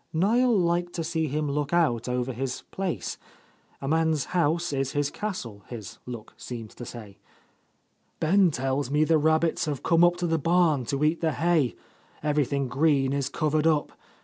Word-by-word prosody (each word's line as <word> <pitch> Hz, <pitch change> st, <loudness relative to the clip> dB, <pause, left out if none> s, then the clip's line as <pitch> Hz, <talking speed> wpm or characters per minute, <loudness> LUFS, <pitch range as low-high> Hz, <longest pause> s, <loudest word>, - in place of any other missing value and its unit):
Niel 225 Hz, +7 st, +3 dB
liked 175 Hz, 0 st, +1 dB
to 165 Hz, -, -2 dB
see 160 Hz, -1 st, -1 dB
him 150 Hz, +2 st, -1 dB
look 145 Hz, 0 st, -2 dB
out 130 Hz, -9 st, +2 dB
over 125 Hz, +1 st, -1 dB
his 130 Hz, +1 st, -4 dB
place. 190 Hz, -3 st, -3 dB, 0.6 s
A 135 Hz, -, -5 dB
man's 160 Hz, -1 st, +1 dB
house 170 Hz, -1 st, +1 dB
is 135 Hz, -1 st, -1 dB
his 145 Hz, -1 st, 0 dB
castle, 120 Hz, -, -5 dB
his 110 Hz, -5 st, -8 dB
look 120 Hz, -3 st, -8 dB
seemed 115 Hz, -3 st, -7 dB
to 120 Hz, -, -9 dB
say. 105 Hz, -5 st, -10 dB, 1.0 s
"Ben 185 Hz, +3 st, +4 dB
tells 135 Hz, -1 st, -1 dB
me 150 Hz, +2 st, +3 dB
the 160 Hz, 0 st, +3 dB
rabbits 160 Hz, +2 st, +2 dB
have 145 Hz, -4 st, -3 dB
come 165 Hz, 0 st, +4 dB
up 175 Hz, 0 st, +5 dB
to 175 Hz, -, -2 dB
the 165 Hz, -1 st, +1 dB
barn 165 Hz, -4 st, +2 dB
to 140 Hz, +5 st, -1 dB
eat 155 Hz, +2 st, +2 dB
the 160 Hz, -2 st, +1 dB
hay, 160 Hz, -6 st, +1 dB, 0.5 s
everything 145 Hz, -2 st, +1 dB
green 135 Hz, 0 st, +2 dB
is 140 Hz, -2 st, -1 dB
covered 155 Hz, 0 st, +1 dB
up. 155 Hz, -2 st, +1 dB
150 Hz, 175 wpm, -26 LUFS, 135-170 Hz, 1.0 s, up